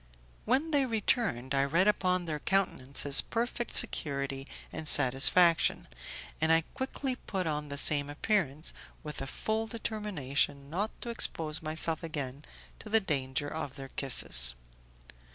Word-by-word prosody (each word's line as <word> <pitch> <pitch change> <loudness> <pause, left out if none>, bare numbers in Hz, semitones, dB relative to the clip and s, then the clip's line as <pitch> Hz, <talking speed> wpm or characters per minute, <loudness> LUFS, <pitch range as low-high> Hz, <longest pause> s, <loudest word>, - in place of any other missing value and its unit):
When 275 +7 +1
they 280 -3 +2
returned, 215 - -1
I 135 0 +2
read 165 +8 +1
upon 185 -3 +1
their 155 -2 -4
countenances 140 -6 +2
perfect 240 +1 -3
security 140 -1 +2 0.3
and 155 - -6
satisfaction, 145 +6 +4 0.5
and 160 0 +2
I 165 0 +5
quickly 260 0 -4
put 190 -7 -4
on 150 -2 -3
the 140 - -6
same 145 0 +2
appearance, 155 -2 -1 0.3
with 150 -2 -6
a 135 - -5
full 220 +10 -2
determination 160 - -3
not 200 +6 -1
to 235 - -3
expose 160 -8 +3
myself 160 0 0
again 145 -4 -6 0.4
to 215 - -10
the 225 +1 +4
danger 145 -6 -3
of 145 -3 -6
their 135 -1 -9
kisses. - - +2
155 Hz, 135 wpm, -30 LUFS, 140-210 Hz, 0.5 s, I